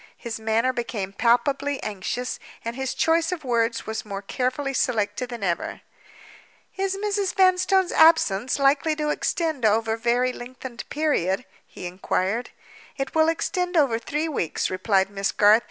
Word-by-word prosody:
His 230 -2 -6
manner 225 +3 +1
became 220 -6 -4
palpably 270 +5 +1
anxious; 215 +5 -3 0.3
and 230 +1 -3
his 265 0 -3
choice 330 +1 +2
of 355 -4 -4
words 235 -2 0
was 220 0 -4
more 200 -1 -6
carefully 260 +5 -2
selected 235 -1 0
than 235 -4 -6
ever. 175 -3 -2 0.9
"Is 390 0 -1
Mrs. 405 -1 -1
Vanstone's 370 0 +3
absence 260 -9 +4
likely 285 +3 +3
to 300 -1 -1
extend 315 -6 -1
over 220 +1 +3
any 225 - -5
very 245 +2 +2
lengthened 245 0 -9
period?" 255 - 0 0.2
he - - -9
inquired. 190 +5 -1 0.5
"It 270 -1 -3
will 320 0 +4
extend 355 +2 -1
over 260 -7 +3
three 295 +7 -2
weeks," 265 - -2
replied 190 +1 +1
Miss 195 0 -1
Garth. 210 +2 +6
250 Hz, 150 wpm, -24 LUFS, 220-310 Hz, 0.9 s, Garth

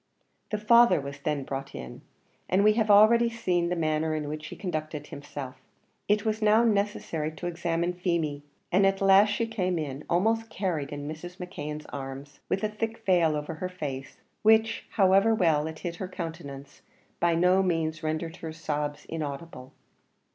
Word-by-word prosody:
The 215 - -1
father 235 -1 +5
was 140 0 -7
then 145 -1 -1
brought 135 +1 -5
in, 65 0 -8 0.5
and 190 +2 +3
we 215 0 +6
have 220 -1 0
already 225 +3 +6
seen 180 -7 0
the 180 - 0
manner 155 -1 0
in 150 -1 -3
which 155 +1 -5
he - - -8
conducted 155 -5 -4
himself. 145 -2 -8 0.5
It 210 +1 +2
was 220 0 0
now 215 +2 +5
necessary 200 -8 0
to 175 - -8
examine 170 0 -1
Feemy, 170 -5 -1 0.3
and 195 +2 +5
at 195 0 +1
last 195 +1 +6
she 205 +3 0
came 185 -6 -1
in, 145 -2 -4
almost 225 +6 +1
carried 165 -8 -2
in 145 0 -5
Mrs. 175 +4 -7
McKeon's 150 -5 -6
arms, 135 +1 -7
with 195 - 0
a - - +3
thick 225 +1 -4
veil 170 -5 +3
over 150 +2 -4
her 180 +4 -4
face, 140 -7 -6 0.2
which, 220 +1 +3
however 195 +2 +4
well 160 -6 +2
it 160 0 -7
hid 170 +1 -5
her 190 - -4
countenance, 160 -6 -7 0.4
by 170 -1 +3
no 180 +3 +4
means 160 -4 -1
rendered 160 +2 -3
her 160 -3 -6
sobs 150 -2 -3
inaudible. 150 -3 -6
170 Hz, 170 wpm, -27 LUFS, 150-200 Hz, 0.5 s, we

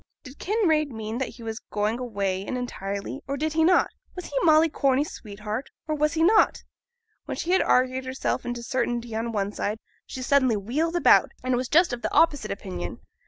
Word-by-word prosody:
Did 265 -1 -12
Kinraid 335 -8 +1
mean 220 -1 -5
that 265 - -1
he 235 - -12
was 225 0 -4
going 210 +3 0
away 200 -6 -2
really 195 - -8
and 255 - -2
entirely, 200 0 -5
or 280 0 -2
did 310 +2 -1
he 320 0 +3
not? 360 +3 +4 0.2
Was 360 - -6
he - - -10
Molly 315 -1 +6
Corney's 280 -1 +1
sweetheart, 215 +4 -6 0.2
or 310 - 0
was 300 +1 +1
he 325 0 +1
not? 425 +5 +4 0.6
When - - -5
she 345 - -2
had 375 - +4
argued 255 +1 +2
herself 260 +1 -2
into 240 -1 -4
certainty 240 -2 -2
on 225 +1 -2
one 205 -2 -1
side, 210 +1 -2 0.3
she 260 - -6
suddenly 260 -4 +3
wheeled 295 - -1
about, 345 - +5
and 255 0 +1
was 250 +1 -1
just 340 -3 +4
of 240 - -4
the - - -2
opposite 290 -8 +3
opinion. 90 - -5
255 Hz, 205 wpm, -25 LUFS, 220-305 Hz, 0.6 s, Molly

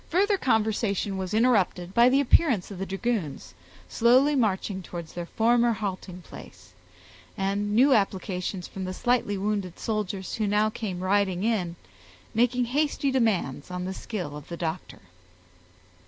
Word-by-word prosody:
Further 400 +5 +3
conversation 215 - 0
was 190 -1 -4
interrupted 205 -6 +2
by 235 +2 +6
the 270 +2 +3
appearance 250 - +3
of 190 - -8
the 195 - -3
dragoons, 190 - -3 0.3
slowly 255 - +4
marching 200 -5 0
towards 170 -2 -8
their 175 -1 -5
former 235 +3 +3
halting 185 -3 -5
place, - - -13 0.6
and 200 +2 -1
new 265 +4 +6
applications 190 -3 -1
from 190 -1 -6
the 185 0 -5
slightly 240 -4 +1
wounded 200 -3 -2
soldiers, 205 -3 -3
who 215 -2 -1
now 210 +1 +2
came 195 -6 -5
riding 190 -1 +1
in, 195 -7 0 0.6
making 245 +2 +2
hasty 285 +2 0
demands 200 - 0
on 180 0 -4
the 190 - -3
skill 180 -7 -5
of 150 - -9
the 170 - -6
doctor. 165 +1 -5
205 Hz, 145 wpm, -26 LUFS, 185-235 Hz, 0.6 s, by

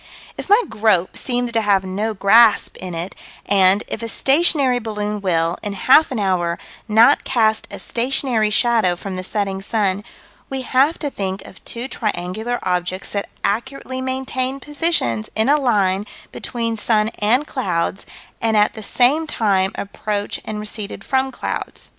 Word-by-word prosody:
If - - -8
my 415 +3 +7
grope 205 -5 +1
seem 245 -1 0
to 230 -1 +1
have 200 -3 +2
no 205 +4 -3
grasp 215 +3 +5
in 180 -2 -6
it, 170 +3 -4 0.3
and, 195 +1 +4
if 225 - -5
a 230 - -4
stationary 275 0 +3
balloon 210 -2 -4
will, 170 -3 0
in 205 - -3
half 265 +10 +5
an 260 - -3
hour, 180 -4 0 0.3
not 230 +6 +5
cast 220 -4 +1
a - - -7
stationary 240 -2 0
shadow 220 -4 +2
from 190 +2 -6
the 185 - -4
setting 195 -1 -2
sun, 200 -1 0 0.5
we 265 -1 -4
have 270 +6 +2
to 290 -3 -4
think 190 -3 -4
of - - -14
two 240 +2 -3
triangular 220 0 -3
objects 180 +1 -2
that 200 -1 -3
accurately 260 +4 -2
maintained 260 0 -2
positions 290 - 0
in 220 +3 +2
a 295 +1 +4
line 205 -5 +1 0.2
between 230 -2 -3
sun 215 0 +1
and 240 +8 +2
clouds, 190 - -2 0.3
and 225 -1 +2
at 210 0 +3
the 220 - -8
same 265 +9 +2
time 195 -7 +1
approached 205 0 -4
and 215 -1 -4
receded 210 -1 -5
from 265 0 0
clouds. - - -5
215 Hz, 160 wpm, -20 LUFS, 195-255 Hz, 0.5 s, my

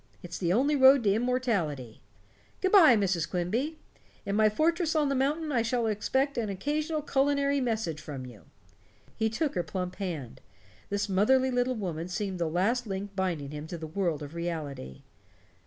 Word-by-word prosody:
It's 175 -1 -7
the 175 -2 0
only 275 +9 +3
road 265 -1 +7
to 200 -2 +3
immortality. 205 - -1 0.6
Good 375 - 0
by, 320 - +8
Mrs. 185 -5 0
Quimby. 230 - -1 0.5
In 200 - -1
my 215 0 +5
fortress 320 - +1
on 300 -2 +2
the - - +1
mountain 295 +4 0
I 245 -4 +2
shall 235 +1 0
expect 265 +6 0
an 220 -3 -2
occasional 300 - -2
culinary 280 0 +1
message 220 - -2
from 140 -4 -7
you." 120 -4 -13 0.7
He 220 0 0
took 285 +6 -1
her 180 - 0
plump 180 +1 -5
hand; 165 - -5 0.5
this 200 +1 -1
motherly 255 +7 +3
little 250 +1 +1
woman 175 -6 -4
seemed 190 0 -3
the 170 - 0
last 220 +9 0
link 195 0 -5
binding 170 -7 -2
him 150 +1 -6
to 170 - -6
the 160 - -6
world 160 -2 -2
of 145 +2 -9
reality. 155 - -5
205 Hz, 170 wpm, -29 LUFS, 175-265 Hz, 0.7 s, by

